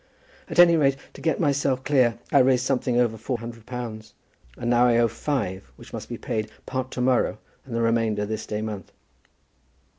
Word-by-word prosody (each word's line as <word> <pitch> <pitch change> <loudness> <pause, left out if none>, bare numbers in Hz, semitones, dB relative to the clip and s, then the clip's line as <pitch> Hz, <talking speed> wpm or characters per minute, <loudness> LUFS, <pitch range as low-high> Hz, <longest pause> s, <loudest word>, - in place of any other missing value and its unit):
At - - -5
any 170 -1 +8
rate, 135 -3 +3 0.2
to - - -12
get 160 - 0
myself 140 -4 +1
clear 125 -5 +3
I 140 - +6
raised 130 -1 +4
something 125 -2 +1
over 115 -2 +1
four 120 +3 -3
hundred 115 -1 -9
pounds, 115 -3 -6 0.4
and - - -4
now 120 +1 +4
I 120 -1 +4
owe 120 0 +4
five 110 -5 -3
which - - -15
must - - -6
be - - -4
paid, 110 -1 -3 0.2
part 130 0 -3
to 125 - -3
morrow, 125 0 +2 0.3
and 120 - -5
the 115 - +1
remainder 115 -2 +1
this 110 +1 -4
day 105 0 -3
month." 105 -3 -6
120 Hz, 190 wpm, -25 LUFS, 110-130 Hz, 0.4 s, any